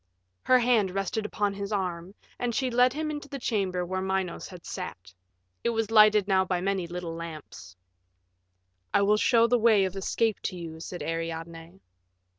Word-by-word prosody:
Her 255 - +5
hand 235 -5 +3
rested 195 +3 -2
upon 205 -1 -1
his 200 +1 -5
arm, 185 -2 -3 0.2
and 240 -2 -1
she 260 -2 0
led 250 +1 +4
him 305 +1 -2
into 295 -1 -6
the 280 - -5
chamber 195 -7 -1
where 185 +1 -3
Minos 190 -2 -2
had 180 -2 -12
sat. 95 - -7 0.5
It - - +2
was 225 -2 -1
lighted 215 -2 +6
now 190 -2 +3
by 185 -1 -1
many 190 -1 -1
little 175 -1 -5
lamps. 155 - -9 1.2
"I 200 - +5
will 210 +1 +4
show 230 +1 +4
the 245 +1 +3
way 215 -4 +5
of 190 0 -4
escape 215 +2 0
to - - -2
you," 165 -2 -7
said 175 +2 -6
Ariadne. 165 +2 -5
195 Hz, 175 wpm, -27 LUFS, 175-225 Hz, 1.2 s, lighted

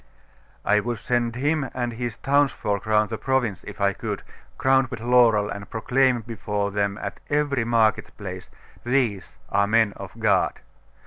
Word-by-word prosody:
'I 105 +1 +4
would 120 +2 -3
send 120 +1 -1
him 145 +1 0
and 120 -2 -2
his 120 -1 -4
townsfolk 135 -8 +1
round 105 0 +2
the 110 - -3
province, 125 -8 0
if - - -8
I 100 -1 +2
could, - - -5 0.3
crowned 130 0 +3
with 120 -3 -6
laurel, 115 -3 +4
and 100 0 -7
proclaim 125 +2 +2
before 105 -2 -3
them 100 0 -1
at - - -6
every 145 -4 +1
market 115 -2 +2
place, - - -7 0.3
"These 120 -7 0
are 100 0 +3
men 110 -1 +3
of - - -8
God." - - +2
115 Hz, 155 wpm, -24 LUFS, 105-130 Hz, 0.3 s, I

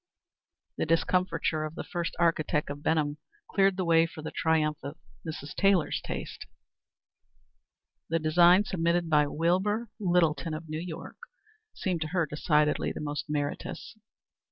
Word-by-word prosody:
The - - -1
discomfiture 165 -1 +1
of 155 +1 -5
the - - -5
first 170 -1 -4
architect 155 -3 +1
of 145 0 -7
Benham 150 -2 0 0.3
cleared 195 -1 +2
the 185 - -1
way 165 0 +4
for 160 -1 -10
the - - -5
triumph 155 -2 +1
of 140 +4 -7 0.3
Mrs. 155 -3 -6
Taylor's 195 -4 +2
taste. - - -6 1.6
The 165 - +2
design 170 +4 +5
submitted 170 -3 0
by 150 -1 +4
Wilbur 190 +9 0
Littleton 170 -4 +1
of 160 +1 -8
New 155 0 -4
York, 170 -2 -7 0.6
seemed 180 -4 -2
to 155 - -1
her 175 0 0
decidedly 150 0 +1
the - - -6
most 150 -1 -3
meritorious. 150 +6 -4
165 Hz, 140 wpm, -28 LUFS, 155-175 Hz, 1.6 s, design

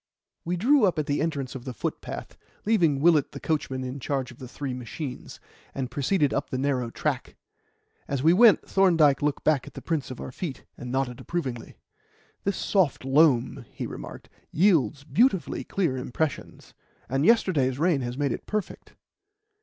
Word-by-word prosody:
We 175 +1 -2
drew 255 +6 +4
up 180 -3 +1
at 155 - 0
the 145 0 0
entrance 145 -5 -2
to 135 - -6
the 125 0 -7
footpath, - - -5 0.3
leaving 170 -11 +3
Willett 155 -3 +4
the - - -6
coachman 135 -4 -2
in 130 +2 -5
charge 130 -1 -2
of 120 - -16
the 130 - -8
three 135 +1 -5
machines, 125 +2 -7 0.4
and 130 -2 -3
proceeded 145 +3 +1
up - - -2
the 130 - -2
narrow 130 -3 0
track. - - -3 0.7
As 140 -1 -2
we 165 +2 +6
went, 225 +3 +6
Thorndyke 165 -8 +4
looked 145 -1 -1
back 150 -5 +2
at - - -12
the - - -7
prints 160 -4 -2
of 130 - -7
our - - -6
feet, 145 +1 -6
and 125 0 -7
nodded 130 -2 -1
approvingly. 130 -9 -4 0.7
"This 200 - 0
soft 175 -10 +1
loam," 135 -2 +3
he - - -5
remarked, - - -8 0.2
"yields 160 -5 +2
beautifully 205 - +1
clear 170 -9 -1
impressions, 135 +3 -4 0.3
and 135 +3 0
yesterday's 160 - +3
rain 160 -2 +2
has 120 0 -4
made 145 -1 0
it - - -5
perfect." 215 -2 -4
145 Hz, 170 wpm, -26 LUFS, 130-170 Hz, 0.7 s, we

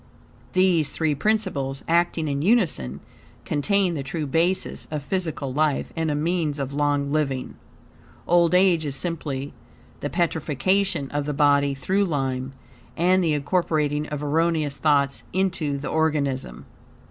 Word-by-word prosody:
These 180 -5 +3
three 155 0 0
principles, 145 -7 -1
acting 170 -1 +1
in 140 -1 -1
unison, 160 - +1 0.4
contain 185 +5 +1
the 150 - -3
true 150 +3 -3
basis 165 +6 0
of 150 -2 -4
physical 160 -6 -2
life 150 0 0
and 160 -1 -1
a 150 - 0
means 155 -1 0
of 140 -1 -4
long 145 -1 0
living. 140 -4 -1 0.7
Old 175 0 +4
age 180 -3 +4
is 140 -3 -2
simply 145 -4 -3 0.5
the 145 - -3
petrifaction 165 -1 0
of 145 0 -2
the 150 - -2
body 140 -1 +3
through 190 +8 +1
lime, 135 -5 -2 0.4
and 185 +2 +3
the 160 -3 +2
incorporating 150 -1 0
of 150 0 -5
erroneous 155 -1 +1
thoughts 140 -2 +1
into 180 -6 0
the 140 - -5
organism. 145 - -1
150 Hz, 135 wpm, -24 LUFS, 140-170 Hz, 0.7 s, Old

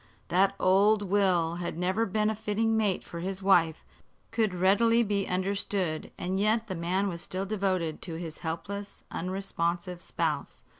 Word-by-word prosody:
That 195 +3 +3
old 205 +3 +4
Will 180 -4 +2
had 175 -2 -4
never 185 +6 +1
been 215 +2 +1
a - - -3
fitting 220 +1 0
mate 210 -4 +1
for 170 - -8
his 190 +2 -4
wife 170 -5 +3 0.5
could 220 -3 +1
readily 205 +6 +4
be 200 -2 0
understood, 185 -3 -1
and 185 +2 -2
yet 215 +2 +2
the 200 - -4
man 185 +3 0
was 170 -3 -4
still 190 +2 -3
devoted 185 -6 -1
to 170 -3 -5
his 165 -1 -6
helpless, 190 +5 -5
unresponsive 175 -1 -2
spouse. 155 -6 -3
190 Hz, 155 wpm, -29 LUFS, 175-205 Hz, 0.5 s, old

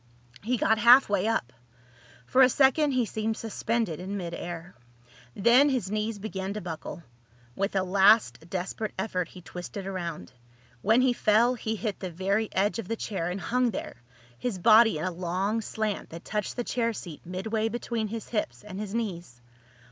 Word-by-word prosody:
He 245 +4 0
got 220 +1 +2
halfway 220 -4 +6
up. 130 - -1 0.7
For 260 - +3
a 255 - +8
second 280 +2 +3
he 250 -2 +2
seemed 220 +1 -2
suspended 225 -5 -2
in 195 +3 -4
mid 170 -3 -5
air. 175 0 -6 0.6
Then 240 +8 +5
his 245 -8 -1
knees 215 +1 -1
began 195 -1 -4
to - - -2
buckle. 170 0 -7 0.5
With 200 +1 -2
a 190 - +2
last 190 - +4
desperate 195 +4 -4
effort 185 -3 -2
he 180 0 -13
twisted 180 +3 -7
around. 170 - -5 0.5
When 225 - +4
he 255 -1 +3
fell 235 +2 +3
he 220 -2 -3
hit 215 -1 -3
the 185 - -4
very 195 +5 0
edge 205 +4 +1
of 215 - -5
the 230 - -1
chair 190 -6 -3
and 180 +2 -3
hung 245 +7 +1
there, 185 - -6 0.4
his 245 -6 -2
body 220 0 +6
in 155 - -3
a 185 - -1
long 185 +5 -1
slant 215 -1 -3
that 165 +1 -10
touched 210 -2 -3
the 245 - -2
chair 230 -1 -1
seat 170 -7 -9
midway 215 +5 -2
between 230 -1 -3
his 225 +1 -6
hips 215 -3 -3
and 205 -2 -8
his 210 0 -5
knees. 175 - -4
210 Hz, 180 wpm, -27 LUFS, 185-225 Hz, 0.7 s, a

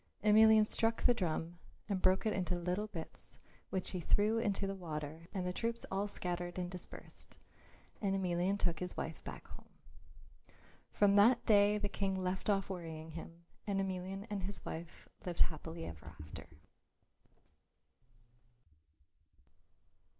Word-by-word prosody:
Emelian 220 0 +7
struck 225 +1 +1
the 245 - +6
drum 170 -4 -2 0.3
and 195 -3 -1
broke 185 +3 +4
it 215 - +2
into 180 -2 0
little 180 +4 -1
bits 170 -6 -8 0.3
which 190 -1 -2
he 185 - -3
threw 210 +6 +3
into 205 -3 0
the 195 - -2
water 160 -3 -6
and 190 -3 -2
the 180 - -1
troops 230 +3 -2
all 195 +2 0
scattered 175 -2 -3
and 180 -1 -2
dispersed. 180 -1 -9 0.6
And 195 -2 +1
Emelian 185 +1 +1
took 175 -5 0
his 180 0 -4
wife 160 - -4
back - - -8
home. - - -12 1.2
From 205 -1 +4
that 230 +5 +6
day 205 -1 +5
the 205 -1 -1
King 195 -1 -1
left 185 +2 -2
off 195 -1 +2
worrying 165 -4 -6
him 165 +1 -9 0.2
and 200 -1 +1
Emelian 190 +1 -3
and 205 -3 -3
his 190 +1 -5
wife 165 +1 -7 0.2
lived 175 -2 -3
happily 160 +1 0
ever 80 -2 -9
after. - - -9
190 Hz, 145 wpm, -35 LUFS, 175-205 Hz, 1.2 s, Emelian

